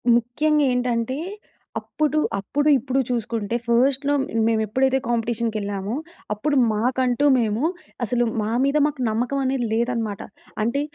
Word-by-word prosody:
ముఖ్యంగా 295 +6 +2
ఏంటంటే 245 +1 0 0.6
అప్పుడు, 305 0 -1 0.2
అప్పుడు, 290 +9 -1
ఇప్పుడు 260 +2 -1
చూసుకుంటే 230 -2 -2
ఫస్ట్‌లో 270 +4 +2 0.3
మేము 220 -1 +2
ఎప్పుడైతే 260 +5 +2
కాంపిటీషన్‌కీ 230 -1 -1
ఎళ్ళామో, 200 +3 -3 0.4
అప్పుడు 285 +8 -1 0.2
మాకంటూ 250 +4 +1
మేము 225 +1 0 0.4
అసలు 240 +2 +1 0.2
మా 210 - -2 0.2
మీద 280 +2 +2
మాకు 290 -3 -5
నమ్మకం 245 +5 -1
అనేది 260 -2 0
లేదన్నమాట. 230 -3 -1 0.4
అంటే 240 +6 0
240 Hz, 120 wpm, -23 LUFS, 225-270 Hz, 0.6 s, ముఖ్యంగా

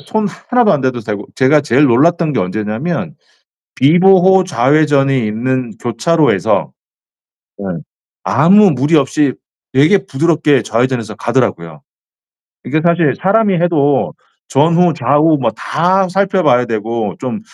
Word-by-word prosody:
손 215 +9 -3
하나도 240 +4 0
안 145 - 0
대도 130 -2 -2
되고 105 -2 -6
제가 140 +3 +2
제일 145 0 +2
놀랐던 155 +5 +2
게 - - -1
언제냐면 110 - -4 0.6
비보호 185 +5 +4
좌회전이 135 -3 +1
있는 125 +3 -3
교차로에서 155 +6 0 0.9
예 - - -6 0.6
아무 195 +7 +4
무리 145 +4 0
없이 140 -1 0 0.4
되게 150 +9 +3
부드럽게 150 -4 0
좌회전 120 +4 -1
해서 110 -3 -8
가더라고요. 85 - -3 0.8
이게 155 +3 -1
사실 170 -4 +1
사람이 200 +1 +1
해도 145 -6 0 0.3
전후좌우 155 -1 +2
뭐 115 - 0
다 185 +4 -1
살펴 195 +1 0
봐야 125 -6 +2
되고 110 -2 -4
좀 135 +11 -5
145 Hz, 275 characters per minute, -14 LUFS, 120-175 Hz, 0.9 s, 비보호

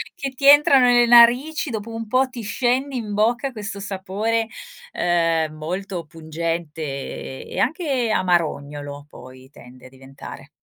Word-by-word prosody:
che 275 - -4
ti 270 +2 -6
entrano 280 -2 +7
nelle 240 -1 +5
narici 245 +7 +5
dopo 225 -1 -6
un 225 0 -6
po' 255 +4 +2
ti 250 -2 -8
scende 255 +5 -1
in 220 -4 -4
bocca 240 +6 0
questo 210 -3 -7
sapore, 205 +3 -2 0.4
ehm, 165 -3 0
molto 175 +3 -5
pungente 165 0 -5
e 135 -2 -6
e - - -4
anche 275 -5 0
amarognolo 145 -6 -1
poi 130 0 -14
tende 125 -1 -16
a - - -16
diventare. 135 +1 -12
200 Hz, 140 wpm, -21 LUFS, 155-240 Hz, 0.4 s, entrano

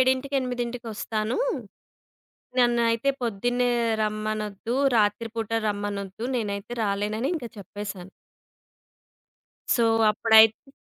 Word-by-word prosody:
ఏడింటికి 260 +2 +2
ఎనిమిదింటికి 245 -1 -4
వస్తాను. 215 - -2 1.2
నన్నైతే 235 +1 +3
పొద్దున్నే 245 +3 0 0.3
రమ్మనొద్దు, 215 +1 -2 0.2
రాత్రిపూట 225 +1 0 0.2
రమ్మనొద్దు. 205 +1 -4
నేనైతే 205 0 -3
రాలేనని 210 +5 -1
ఇంకా 240 -6 -6
చెప్పేసాను. 200 -1 -7 1.7
సో, 235 - +2 0.3
అప్పుడైతే 220 +4 +5
220 Hz, 75 wpm, -25 LUFS, 205-240 Hz, 1.7 s, అప్పుడైతే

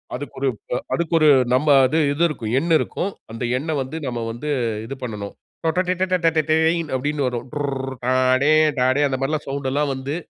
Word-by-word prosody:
அதுக்கொரு 135 0 -4 0.2
ப் - - -3 0.2
அதுக்கு 170 -1 -1
ஒரு 155 -1 +5 0.2
நம்ம 135 +5 +2 0.2
அது 155 +5 +1
இது 145 +4 0
இருக்கும். 120 -9 -5
எண் 170 +4 -2
இருக்கும். 190 +5 -3 0.2
அந்த 115 +2 -6
எண்ண 150 +5 -5
வந்து, 130 +5 -5
நம்ம 120 -2 -3
வந்து 120 +7 -6 0.4
இது 135 +4 -6
பண்ணனும். 105 -4 -5 0.3
டொடொடேடடடேய் 165 -2 +1 0.2
அப்படினு 145 +2 -1
வரும். 120 -2 -3
டுர்ர், 135 -2 -3
அ, - - +3 0.3
டே, 150 - +4 0.3
டாடே, 130 +3 +2
அந்த 135 -1 -2
மாரி 155 +3 0
சௌண்டெல்லாம் 140 +1 -1
வந்து. 135 +3 -4
145 Hz, 165 wpm, -21 LUFS, 130-160 Hz, 0.4 s, ஒரு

